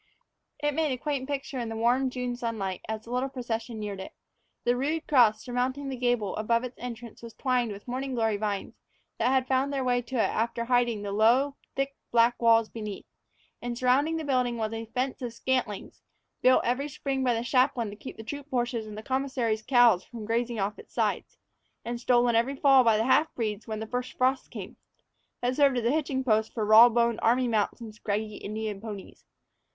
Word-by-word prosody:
It 295 0 -1
made 310 -1 +1
a 255 - -1
quaint 275 0 -3
picture 280 -1 -3
in 235 -2 -3
the 225 - -5
warm 245 +4 +2
June 250 -1 -3
sunlight 220 -6 -3
as 220 0 -3
the 230 - -11
little 255 +2 0
procession 235 -3 -4
neared 205 -2 -5
it. 190 - -8 0.5
The 245 0 +2
rude 305 +5 -2
cross 225 -6 +4
surmounting 260 +3 -2
the 265 - -3
gable 245 -5 0
above 230 +2 +1
its 250 0 -7
entrance 235 -1 -8
was 230 -1 -10
twined 250 -3 0
with 200 +3 -10
morning 260 +1 -3
glory 225 -3 +1
vines 205 -1 -3 0.5
that 230 - +2
had 260 -1 +2
found 265 +2 +1
their 275 -2 -1
way 245 -1 +2
to 245 +2 -8
it 230 - +2
after 235 +1 -1
hiding 240 -3 +1
the 200 - -4
low, 240 +7 +3 0.2
thick, 275 0 -2
black 235 +1 +3
walls 230 -1 +5
beneath; 210 -3 -7 0.6
and 240 0 -4
surrounding 275 +6 +2
the 320 - -3
building 250 -4 0
was 220 -1 -2
a 225 0 -5
fence 255 +4 -2
of 240 -2 -4
scantlings 240 -4 -2 0.4
built 255 0 +5
every 255 +4 0
spring 270 -1 -2
by 245 -2 +2
the 230 - -2
chaplain 250 -3 +1
to - - -9
keep 240 - -9
the 220 - -8
troop 285 +5 -7
horses 240 -3 -1
and 210 0 -8
the 215 - -7
commissary's 260 -4 -1
cows 235 -6 +5
from 230 -3 -9
grazing 230 +1 -1
off 200 +2 -2
its - - -15
sides, - - -1 0.5
and 235 0 -4
stolen 240 -1 +3
every 240 +5 +2
fall 270 -1 +6
by 225 -2 +4
the 220 - +1
half 305 +5 +3
breeds 215 -2 -3
when 215 -1 -4
the 220 - -4
first 250 +2 -4
frosts 260 +1 +1
came - - -9 0.6
that 245 +1 0
served 280 -3 +4
as 235 - -1
a 235 - +3
hitching 280 -3 0
post 220 -3 +2
for 220 - -1
raw 220 +3 +9
boned 235 -1 +1
army 245 +2 +3
mounts 220 -1 0
and 220 -2 -8
scraggy 210 0 -3
Indian 215 -1 -5
ponies. 210 -4 -9
240 Hz, 210 wpm, -28 LUFS, 220-260 Hz, 0.6 s, raw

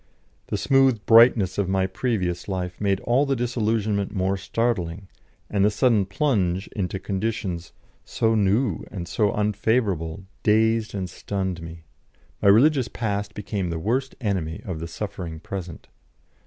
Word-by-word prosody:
The - - -2
smooth 135 -5 +3
brightness 115 -5 +6
of 95 -2 0
my 95 0 +2
previous 95 -4 -2
life 90 -2 -4
made 100 -2 +1
all 130 +5 +2
the 135 - +1
disillusionment 110 -4 0
more 95 -1 0
startling, 95 -3 -2 0.4
and 100 -1 +1
the 105 - +5
sudden 105 -2 +2
plunge 95 - 0
into 95 -2 -3
conditions 95 -3 -3 0.3
so 115 0 0
new 105 -1 +1
and 90 -4 -6
so 105 +2 +1
unfavourable 105 -5 0 0.2
dazed 110 0 +2
and 95 -2 -2
stunned 95 -1 -4
me. 85 0 -9 0.6
My 100 - +5
religious 130 +4 +5
past 105 -3 -3
became 100 -3 -3
the 85 - -2
worst 125 +10 -1
enemy 95 -9 -2
of 90 -5 -4
the 85 - -5
suffering 85 -3 -6
present. 90 -2 -7
100 Hz, 140 wpm, -24 LUFS, 90-115 Hz, 0.6 s, brightness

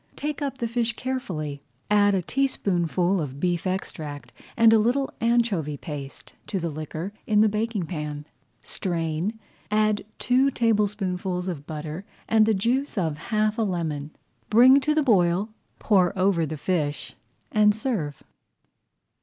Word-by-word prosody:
Take 300 0 -4
up 275 -2 -2
the 235 - -2
fish 235 0 0
carefully, 180 - -3 0.3
[Page 210 - +2
92] - - +6
add 205 -1 +4
a 190 - +1
teaspoonful 185 - +1
of 140 -2 -5
beef 175 +2 0
extract 155 -6 -5 0.2
and 225 -1 +7
a 225 - +6
little 250 +5 +1
anchovy 230 -11 +1
paste 140 -2 -8
to 195 - -2
the 170 -1 -2
liquor 155 +5 -5
in 210 -1 +4
the 220 - +6
baking 210 -2 -1
pan, 150 -3 -5 0.4
strain, 170 +4 -2 0.3
add 215 0 +2
two 255 +3 +3
tablespoonfuls 195 -6 0
of 150 -6 -5
butter 155 +3 -5 0.2
and 220 -1 +4
the 220 - +3
juice 245 +6 0
of 160 -5 0
half 215 0 +1
a - - +3
lemon, 160 -8 -2 0.4
bring 255 +5 +7
to 305 +2 0
the 310 - +3
boil, 190 -4 +3 0.3
pour 190 -3 +2
over 185 -4 +2
the 155 +1 -5
fish, 150 -2 -2 0.4
and 210 -1 +4
serve. 215 - -3
195 Hz, 150 wpm, -25 LUFS, 165-225 Hz, 0.4 s, and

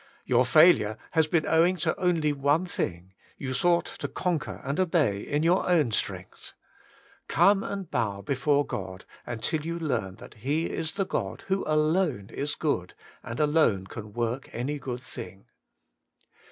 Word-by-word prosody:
Your 125 0 +3
failure 125 -8 +5
has 160 -2 +3
been 160 0 +1
owing 170 +3 +3
to 155 - 0
only 165 -5 +2
one 145 +5 +2
thing: 90 - -4 0.2
you 130 -1 -4
sought 170 +6 +2
to - - -6
conquer 175 -5 -2
and 140 +6 -2
obey 160 - +2
in 145 +2 -1
your 175 +2 +2
own 155 -9 +3
strength. - - -4 0.7
Come 195 +5 +4
and 200 -2 -4
bow 100 -3 -1
before 140 +4 +1
God 95 -7 -6 0.2
until 120 +6 -2
you 170 +1 -3
learn 120 - -2
that - - -13
He 145 +9 0
is 160 -1 -3
the 195 -1 -1
God - - -3
who 190 0 +1
alone 155 - +1
is 145 +1 -2
good, 115 - -2 0.3
and 115 - -6
alone 150 -11 +3
can 105 +1 -9
work 120 +3 -2
any 140 +5 -3
good 125 -2 -5
thing. 115 -6 -10
145 Hz, 155 wpm, -27 LUFS, 120-165 Hz, 0.7 s, failure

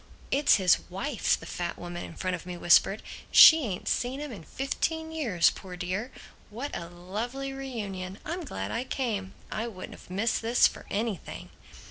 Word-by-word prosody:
"It's 285 +2 +5
his 185 -3 +4
wife," 225 +8 0
the - - -10
fat 175 -1 -4
woman 175 0 -6
in 165 - -9
front 185 -1 -2
of 180 - -10
me 180 -1 -5
whispered. 175 +4 +4 0.3
"She 315 -3 +9
ain't 185 -3 -5
seen 255 +3 0
'im 295 -2 -5
in 195 -8 -8
fifteen 320 - -2
years, 205 - +3
poor 185 -2 -9
dear! 190 +7 -3 0.4
What 245 +7 -5
a 170 - -5
lovely 225 +10 -5
re 270 0 -6
union. 195 -5 -5
I'm 345 +2 -3
glad 285 - -5
I 235 - -1
came. 220 -8 -3 0.2
I 220 +2 -2
wouldn't 185 -5 -8
have - - -14
missed 205 +5 0
this 230 +2 +4
for - - -1
anything!" 210 -3 -4
215 Hz, 180 wpm, -28 LUFS, 185-265 Hz, 0.4 s, She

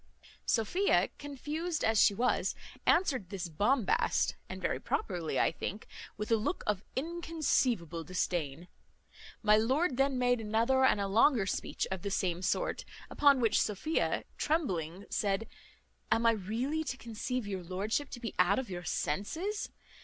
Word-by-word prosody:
Sophia, 350 - +2
confused 300 +4 -3
as 220 -1 +4
she 200 - +5
was, 250 +4 +1 0.3
answered 260 - +2
this 190 -2 -4
bombast 205 - +1
(and - - -6
very - - -1
properly 175 - -2
I - - +3
think) 200 +5 -5 0.3
with 210 +2 -4
a 225 - +5
look 225 - -2
of 210 -1 0
inconceivable 270 - 0
disdain. 175 -3 -2 0.8
My 210 0 +6
lord 260 +6 +1
then 270 -1 +2
made 245 -1 +2
another 230 +5 +2
and 260 - +4
a 200 - 0
longer 225 +2 +4
speech 195 - -2
of 190 -2 -3
the 200 - -3
same 180 -3 -1
sort. 185 - -1 0.3
Upon 285 -2 +5
which 225 - +3
Sophia, 220 - 0 0.2
trembling, 190 - -1
said, 200 +1 0 0.6
"Am 225 +1 +3
I 230 - +7
really 230 +10 -2
to 260 -1 -3
conceive 235 +1 -4
your 195 -2 -4
lordship 205 +10 -2
to 240 - -7
be 230 -2 -5
out 180 +2 +4
of 255 -6 -3
your 175 -1 -5
senses? 320 - -2
225 Hz, 150 wpm, -32 LUFS, 195-270 Hz, 0.8 s, I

